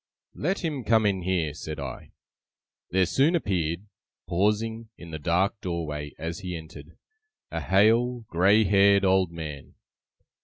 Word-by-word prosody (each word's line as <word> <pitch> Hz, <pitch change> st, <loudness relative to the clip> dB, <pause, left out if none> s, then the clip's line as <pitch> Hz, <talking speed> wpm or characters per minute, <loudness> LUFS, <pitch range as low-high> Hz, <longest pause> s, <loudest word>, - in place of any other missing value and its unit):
'Let 185 Hz, +6 st, -2 dB
him 145 Hz, -6 st, -2 dB
come 110 Hz, 0 st, +3 dB
in 95 Hz, -2 st, +1 dB
here!' 85 Hz, -4 st, -1 dB
said 75 Hz, -1 st, -7 dB
I. 70 Hz, -2 st, -7 dB, 0.8 s
There 95 Hz, +1 st, +3 dB
soon 140 Hz, -, +2 dB
appeared, 90 Hz, -, -1 dB, 0.4 s
pausing 105 Hz, +5 st, 0 dB
in 85 Hz, -1 st, -11 dB
the 80 Hz, -, -5 dB
dark 95 Hz, +7 st, 0 dB
doorway 75 Hz, -4 st, -4 dB
as 80 Hz, +3 st, -5 dB
he 90 Hz, -3 st, -5 dB
entered, 80 Hz, 0 st, -12 dB, 0.5 s
a -, -, -3 dB
hale, 115 Hz, +5 st, +3 dB
grey 100 Hz, +2 st, +3 dB
haired 100 Hz, 0 st, +4 dB
old 95 Hz, -2 st, +3 dB
man. 75 Hz, -4 st, -8 dB
95 Hz, 140 wpm, -26 LUFS, 85-110 Hz, 0.8 s, haired